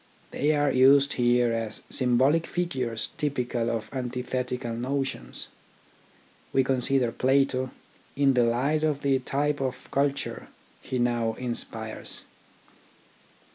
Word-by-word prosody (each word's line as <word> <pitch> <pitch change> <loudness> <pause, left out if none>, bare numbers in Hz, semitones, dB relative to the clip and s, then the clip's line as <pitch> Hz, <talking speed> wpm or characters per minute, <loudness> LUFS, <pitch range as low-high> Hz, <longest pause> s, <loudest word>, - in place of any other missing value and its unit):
They 150 +2 +1
are 145 -1 +2
used 135 +2 +5
here 120 -1 +3
as 115 -2 -3
symbolic 130 +6 +3
figures 130 -11 -2
typical 125 -5 -1
of 115 -2 -2
antithetical 125 -1 -3
notions. 135 +3 -3 1.0
We 135 - +3
consider 130 -1 +1
Plato 130 0 +2 0.5
in 140 -1 +4
the 125 -1 +4
light 135 +6 +1
of 150 -2 0
the 135 -1 +3
type 145 +2 -1
of 130 -1 -4
culture 140 0 -1 0.3
he 130 - -3
now 120 -2 +1
inspires. 115 -3 -4
130 Hz, 110 wpm, -27 LUFS, 120-140 Hz, 1.0 s, used